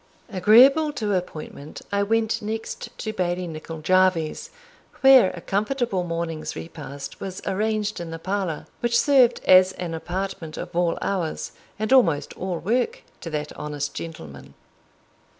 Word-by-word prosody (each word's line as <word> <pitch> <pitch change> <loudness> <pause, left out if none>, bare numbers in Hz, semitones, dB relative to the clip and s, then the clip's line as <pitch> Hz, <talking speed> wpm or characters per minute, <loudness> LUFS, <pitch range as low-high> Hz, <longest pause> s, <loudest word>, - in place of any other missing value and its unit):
Agreeable 260 - +6
to 215 -7 -2
appointment, 155 -5 -5
I 200 0 +1
went 225 +2 +1
next 220 +1 -5
to 215 - -4
Bailie 180 -2 -1
Nicol 160 -1 -7
Jarvie's, 185 -2 +2 0.5
where 265 -7 +8
a 175 - -8
comfortable 215 0 -1
morning's 165 -2 -4
repast 145 -4 -8
was 190 -1 -5
arranged 215 +1 -1
in 170 -1 -6
the 165 - -5
parlour, 185 -2 -3
which 235 0 +1
served 260 -4 +4
as 185 0 +6
an 175 -3 -5
apartment 175 -1 -5
of - - -7
all 175 -1 +1
hours, 180 -5 -2 0.3
and 215 +4 0
almost 170 - +3
all 185 -2 -3
work, 250 - -1 0.2
to 170 - -7
that 150 -1 -4
honest 145 -1 -4
gentleman. 80 - -9
185 Hz, 140 wpm, -24 LUFS, 165-215 Hz, 0.5 s, where